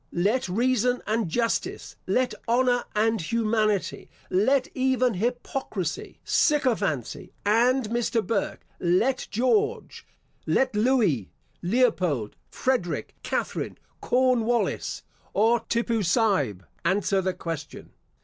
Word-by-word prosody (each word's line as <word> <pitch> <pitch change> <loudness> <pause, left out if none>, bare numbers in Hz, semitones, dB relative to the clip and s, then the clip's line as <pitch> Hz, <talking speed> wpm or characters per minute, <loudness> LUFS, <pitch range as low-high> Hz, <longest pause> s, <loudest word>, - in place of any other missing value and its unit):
Let 200 +5 +1
reason 250 +4 +1
and 215 -3 0
justice, 230 +6 -2
let 255 0 +1
honour 245 +1 +2
and 220 -1 +2
humanity, 215 0 0 0.2
let 255 +8 +3
even 255 -2 +2
hypocrisy, 225 - -3
sycophancy 225 - 0
and 240 +4 +3
Mr. 235 -1 0
Burke, 225 -3 -2
let 205 +10 +1
George, 425 - 0 0.4
let 260 -4 +2
Louis, 210 - +2 0.3
Leopold, 180 - +1
Frederic, 250 -10 -1
Catherine, - - -3 0.2
Cornwallis, 245 -2 +1 0.3
or 225 +3 +4
Tippoo 230 -1 +1
Saib, 175 - +1 0.2
answer 195 +1 +1
the 185 0 -1
question. 165 -4 -6
225 Hz, 95 wpm, -26 LUFS, 190-250 Hz, 0.4 s, or